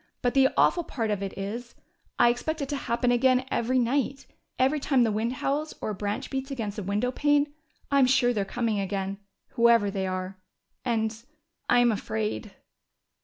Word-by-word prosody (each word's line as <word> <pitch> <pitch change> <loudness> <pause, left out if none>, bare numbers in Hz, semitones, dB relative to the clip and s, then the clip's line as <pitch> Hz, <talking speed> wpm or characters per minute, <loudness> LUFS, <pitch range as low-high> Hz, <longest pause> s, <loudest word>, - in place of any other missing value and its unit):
But 245 - +2
the 270 -1 +5
awful 345 - +4
part 225 -8 -3
of 205 -2 -1
it 195 -1 -5
is: 230 +5 -5 0.4
I 240 - +6
expect 315 +7 -2
it 280 - -2
to 290 - -1
happen 245 -2 0
again 255 +1 +3
every 250 +3 +1
night. 270 +2 0 0.3
Every 270 +4 +2
time 270 -3 +3
the 225 - +2
wind 220 +4 -1
howls 290 +4 -2
or - - -3
a - - -3
branch 205 +1 -4
beats 270 0 -3
against 220 -7 -4
a - - -3
windowpane, 270 +9 +1 0.4
I'm 275 -2 +5
sure 250 -1 +3
they're 205 -3 0
coming 220 +1 -1
again 195 0 -3 0.3
whoever 230 -3 +4
they 190 -1 -2
are. 185 0 -4 0.4
And 225 -2 0 0.5
I'm 245 -1 +5
afraid!" 110 - -3
235 Hz, 170 wpm, -27 LUFS, 205-265 Hz, 0.5 s, I